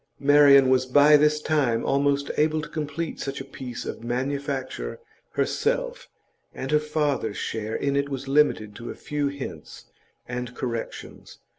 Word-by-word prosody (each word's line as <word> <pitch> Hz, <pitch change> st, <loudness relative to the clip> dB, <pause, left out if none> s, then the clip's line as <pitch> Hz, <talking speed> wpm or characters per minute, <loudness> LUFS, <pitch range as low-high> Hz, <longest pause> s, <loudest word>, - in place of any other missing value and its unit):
Marian 140 Hz, -1 st, +7 dB
was 130 Hz, 0 st, +3 dB
by 145 Hz, +3 st, +6 dB
this 150 Hz, +1 st, +4 dB
time 145 Hz, -7 st, +1 dB
almost 140 Hz, 0 st, +1 dB
able 155 Hz, +1 st, +2 dB
to -, -, -6 dB
complete 155 Hz, +1 st, -4 dB
such 140 Hz, 0 st, -4 dB
a 135 Hz, -, -6 dB
piece 130 Hz, -3 st, -7 dB
of -, -, -6 dB
manufacture 135 Hz, -, -3 dB, 0.3 s
herself -, -, -1 dB, 0.5 s
and 135 Hz, +2 st, -4 dB
her 150 Hz, -, +5 dB
father's 150 Hz, -8 st, -1 dB
share 110 Hz, 0 st, -3 dB
in 140 Hz, 0 st, 0 dB
it 140 Hz, 0 st, 0 dB
was 135 Hz, -1 st, -5 dB
limited 135 Hz, -7 st, +2 dB
to 115 Hz, -, -7 dB
a -, -, -6 dB
few 145 Hz, -1 st, -2 dB
hints 140 Hz, -1 st, -7 dB, 0.4 s
and 125 Hz, 0 st, -5 dB
corrections. 115 Hz, -3 st, -6 dB
140 Hz, 150 wpm, -25 LUFS, 130-150 Hz, 0.5 s, Marian